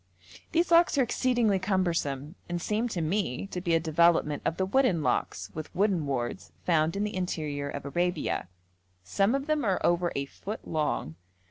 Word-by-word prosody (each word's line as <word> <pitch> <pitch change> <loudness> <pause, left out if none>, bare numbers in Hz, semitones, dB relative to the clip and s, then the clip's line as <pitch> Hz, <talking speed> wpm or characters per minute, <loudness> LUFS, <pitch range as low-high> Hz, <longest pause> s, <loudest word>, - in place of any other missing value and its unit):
These 340 +1 +1
locks 335 -3 +5
are 270 - +5
exceedingly 240 -4 +2
cumbersome, 170 -7 -1 0.2
and 175 0 -1
seem 215 +6 0
to 185 -7 -3
me 165 -3 -1
to 185 -2 -5
be 170 -2 +2
a - - +4
development 160 -2 +3
of 165 - 0
the 190 - +1
wooden 195 - +2
locks - - -1
with 155 -1 -6
wooden 185 -5 +1
wards 130 +5 -3
found 160 -1 +2
in 200 - 0
the 210 -1 -3
interior 150 -6 -2
of 140 0 -6
Arabia. 175 - -1 0.6
Some 195 - +1
of 275 0 -2
them 305 -1 0
are 195 -4 +1
over 175 0 +2
a 140 - -1
foot 205 +9 -8
long. 150 - -1
175 Hz, 175 wpm, -28 LUFS, 155-210 Hz, 0.6 s, locks